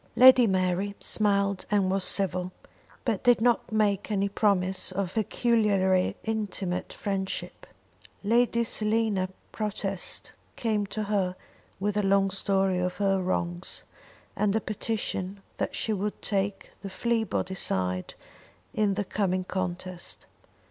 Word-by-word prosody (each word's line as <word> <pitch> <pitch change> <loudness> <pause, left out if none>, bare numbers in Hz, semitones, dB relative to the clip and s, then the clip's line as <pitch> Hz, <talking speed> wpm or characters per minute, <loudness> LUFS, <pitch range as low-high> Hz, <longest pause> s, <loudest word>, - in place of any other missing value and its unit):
Lady 255 -1 +8
Mary 190 +1 0
smiled 200 -2 +1
and 200 -3 +2
was 195 0 +1
civil, 185 -2 +1 0.5
but 225 -6 0
did 245 -2 +5
not 240 0 +2
make 205 -2 +1
any 200 -1 +1
promise 190 -2 +2
of 185 -1 -2
peculiarly 210 -4 +2
intimate 205 -5 -2
friendship. 195 -1 -4 0.6
Lady 235 +2 +3
Selina 215 -4 +1 0.2
Protest 200 -3 -3 0.2
came 215 -3 0
to 215 +2 -3
her 195 -3 0 0.4
with 205 +1 -1
a - - +3
long 195 0 +3
story 195 -1 +1
of 180 0 -2
her 195 -1 +2
wrongs, 175 -1 -2 0.5
and 210 -1 +1
a - - +3
petition 205 -3 -3 0.2
that - - -2
she 220 - 0
would 205 +1 -2
take 200 -1 -2
the 195 - -6
Fleabody 220 -2 -1
side 90 - -1 0.6
in 205 -2 +1
the 205 0 -1
coming 185 -2 0
contest. 185 -1 -4
200 Hz, 125 wpm, -28 LUFS, 185-215 Hz, 0.6 s, Lady